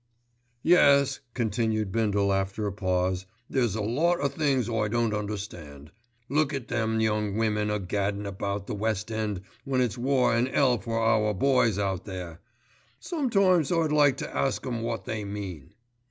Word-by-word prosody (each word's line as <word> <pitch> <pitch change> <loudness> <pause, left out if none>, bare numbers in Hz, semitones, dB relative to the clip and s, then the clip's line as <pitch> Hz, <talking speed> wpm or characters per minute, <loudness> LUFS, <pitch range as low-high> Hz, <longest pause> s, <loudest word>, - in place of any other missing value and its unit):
"Yes," 140 -5 +5 0.2
continued 110 -3 0
Bindle 100 -2 +1
after 95 +2 -1
a 100 - -1
pause, 95 -1 -1 0.2
"there's 120 -6 0
a 110 - -2
lot 160 +11 +1
o' 140 - +1
things 140 -4 0
I 110 -3 0
don't 115 0 0
understand. 95 -9 -6 0.4
Look 150 +1 +1
at 130 -3 -6
them 110 -2 0
young 105 -2 0
women 105 -1 +1
a 105 - 0
gaddin' 100 +2 -2
about 100 0 -3
the - - -5
West 105 +1 -2
End 105 -4 -2 0.2
when 135 -2 0
it's 125 -1 0
war 130 -1 +2
an' 120 +2 +2
'ell 130 -3 +2
for 115 +4 -3
our 105 -2 +2
boys 125 -2 +3
out 95 -3 -2
there. 90 -4 -7 0.6
Sometimes 195 - +2
I'd 165 -3 +2
like 145 -3 +4
to - - -6
ask 135 - 0
'em 120 -3 -3
wot 115 -4 -3
they 110 -1 -3
mean." 100 -8 -7
110 Hz, 165 wpm, -27 LUFS, 100-130 Hz, 0.6 s, Yes